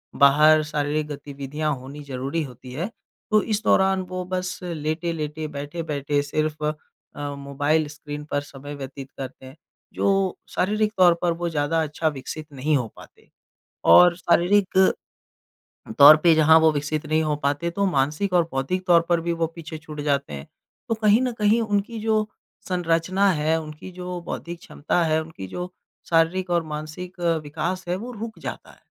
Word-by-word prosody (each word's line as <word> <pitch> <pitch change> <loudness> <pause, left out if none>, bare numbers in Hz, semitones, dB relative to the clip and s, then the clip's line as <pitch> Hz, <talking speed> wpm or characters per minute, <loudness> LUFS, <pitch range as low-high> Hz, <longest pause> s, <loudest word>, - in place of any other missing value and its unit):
बाहर 150 +3 +6
शारीरिक 150 0 -1
गतिविधियाँ 145 +1 -4
होनी 135 +3 -10
ज़रूरी 140 +3 -3
होती 125 -1 -10
है। 170 - -3 0.4
तो 215 - +5
इस 215 0 -1
दौरान 190 -2 +3
वो 185 0 -3
बस 185 0 -3
लेट-लेटे 155 -1 -3
बैठे-बैठे 145 -1 -2
सिर्फ 155 +1 -2 0.5
अ, 145 0 -4
मोबाइल 145 +2 0
स्क्रीन 150 0 -7
पर 145 - +1
समय 145 0 -9
व्यतीत 135 -1 -8
करते 130 0 -8
हैं। 130 +2 -12 0.4
जो 195 -2 +1
शारीरिक 210 +3 0
तौर 180 -2 +7
पर 175 -1 +2
वो 175 -1 -1
ज़्यादा 160 +1 0
अच्छा 155 +1 -2
विकसित 155 +1 -5
नहीं 145 +3 0
हो 125 -4 -2
पाते। - - -17 0.6
और 175 - +8
शारीरिक, 185 +3 +2 1.2
तौर 145 +2 +11
पे 170 -2 +6
जहाँ 160 +1 +6
वो 160 0 +5
विकसित 150 +1 -2
नहीं 155 +1 +2
हो 155 -1 0
पाते 145 +4 0
तो 200 +4 -1
मानसिक 150 +5 0
और 175 -1 +5
बौद्धिक 180 +8 -2
तौर 170 -1 +6
पर 170 -1 +3
भी 170 +1 -1
वो 165 -1 0
पीछे 160 -1 -7
छूट 150 -1 -8
जाते 140 - -1
हैं 70 -1 -7 0.4
तो 225 - +1
कहीं 215 0 +4
ना 255 -1 0
कहीं 220 0 +2
उनकी 210 +1 -1
जो 215 -1 +1 0.4
संरचना 180 +2 +1
है 160 0 +1
उनकी 155 +3 -9
जो 180 0 -6
बौद्धिक 170 0 -5
क्षमता 170 +3 -1
है 160 0 +2
उनकी 155 -12 -9
जो 180 - -6 0.4
शारीरिक 175 +3 +2
और 170 -1 +2
मानसिक 165 +5 -7 0.2
विकास 170 +5 -3
है 175 - 0
वो 240 +6 -7
रुक 225 0 -7
जाता - - -7
है - - -20
160 Hz, 165 wpm, -24 LUFS, 145-180 Hz, 1.2 s, तौर